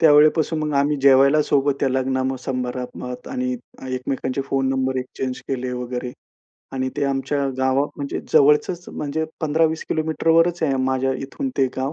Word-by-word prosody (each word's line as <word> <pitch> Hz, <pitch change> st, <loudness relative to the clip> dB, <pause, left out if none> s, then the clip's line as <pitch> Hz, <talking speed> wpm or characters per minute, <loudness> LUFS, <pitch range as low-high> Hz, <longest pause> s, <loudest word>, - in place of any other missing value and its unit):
त्यावेळेपासून 155 Hz, +1 st, +5 dB
मग 150 Hz, -1 st, -1 dB
आम्ही 145 Hz, +1 st, +2 dB
जेवायला 140 Hz, +2 st, +6 dB
सोबत 140 Hz, -1 st, +2 dB
त्या 135 Hz, -, +2 dB
लग्न 130 Hz, 0 st, 0 dB
समारंभात 125 Hz, -1 st, -4 dB
आणि 255 Hz, -1 st, -2 dB, 0.4 s
एकमेकांचे 130 Hz, +1 st, -2 dB
फोन 135 Hz, -1 st, 0 dB
नंबर 130 Hz, 0 st, 0 dB
एक्स्चेंज 130 Hz, 0 st, -4 dB
केले 130 Hz, -1 st, -2 dB
वगैरे. 125 Hz, 0 st, -4 dB, 0.6 s
आणि 130 Hz, 0 st, -1 dB
ते 145 Hz, -, 0 dB
आमच्या 140 Hz, +1 st, 0 dB
गावात 130 Hz, +2 st, +2 dB
म्हणजे 140 Hz, -1 st, -4 dB
जवळचंच 150 Hz, +5 st, +4 dB
म्हणजे 150 Hz, +2 st, -3 dB, 0.2 s
15-20 160 Hz, +1 st, +1 dB
किलोमीटरवरच 165 Hz, +2 st, +2 dB
आहे 140 Hz, -4 st, +2 dB
माझ्या 130 Hz, 0 st, +1 dB
इथून 200 Hz, -, -4 dB
ते 135 Hz, -, +4 dB
गाव. 135 Hz, +2 st, -1 dB
135 Hz, 145 wpm, -22 LUFS, 130-150 Hz, 0.6 s, जेवायला